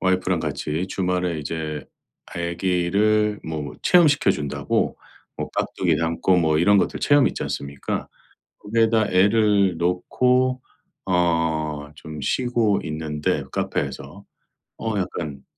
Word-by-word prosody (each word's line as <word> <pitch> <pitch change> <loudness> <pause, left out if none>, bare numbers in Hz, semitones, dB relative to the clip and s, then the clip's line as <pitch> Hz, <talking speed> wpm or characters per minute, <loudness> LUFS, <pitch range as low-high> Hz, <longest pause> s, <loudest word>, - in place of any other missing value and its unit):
와이프랑 95 -1 +1
같이 80 +4 -3
주말에 90 -3 -1
이제 75 0 -4 0.4
아기를 95 +5 0
뭐 80 -2 -5
체험시켜 155 - +5
준다고 70 -4 -1 0.4
뭐 - - -4
깍두기 - - 0
담고 85 +3 +1
뭐 80 -3 +2
이런 100 +5 +5
것들 - - 0
체험 145 -2 +4
있지 - - -2
않습니까? 70 0 -4 0.5
거기에다 110 0 +2
애를 100 -1 +3
놓고 125 +9 +1 0.4
어 85 -3 +2 0.5
좀 75 -1 -9
쉬고 115 - +1
있는데 75 -1 -2
카페에서. 85 +9 -4 0.6
어 110 -2 -2
약간 80 -7 -4
90 Hz, 245 characters per minute, -23 LUFS, 80-105 Hz, 0.6 s, 체험시켜